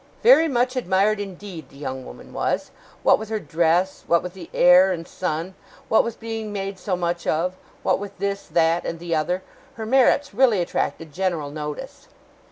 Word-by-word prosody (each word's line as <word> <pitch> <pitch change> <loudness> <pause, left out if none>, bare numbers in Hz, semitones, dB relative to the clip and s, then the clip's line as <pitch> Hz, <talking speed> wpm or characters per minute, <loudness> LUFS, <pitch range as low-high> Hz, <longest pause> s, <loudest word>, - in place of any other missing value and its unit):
'Very 440 -9 +7
much 255 -2 +1
admired, 205 -2 +2
indeed, 190 -6 -7
the - - -16
young 130 -2 -5
woman - - -12
was. - - -1 0.3
What - - +5
with 220 0 -7
her 220 -1 -1
dress; 170 +3 +1
what 170 0 +3
with 180 -1 -6
the 190 - -10
air 180 +2 +6
and 165 -2 -4
sun; 180 +1 -3 0.4
what 220 - +5
with 230 -1 -5
being 225 -2 -5
made 195 -1 -4
so 185 0 -1
much 175 -1 -2
of; 175 +4 +1 0.3
what - - +2
with 205 0 -8
this, 200 0 -3
that, 165 0 +2
and 165 - -4
the 170 0 -4
other; 175 +4 0 0.3
her 220 - -5
merits 265 +2 +3
really 235 -3 +4
attracted 165 -2 -2
general 170 -5 -1
notice. 150 0 -7
185 Hz, 180 wpm, -23 LUFS, 165-215 Hz, 0.4 s, Very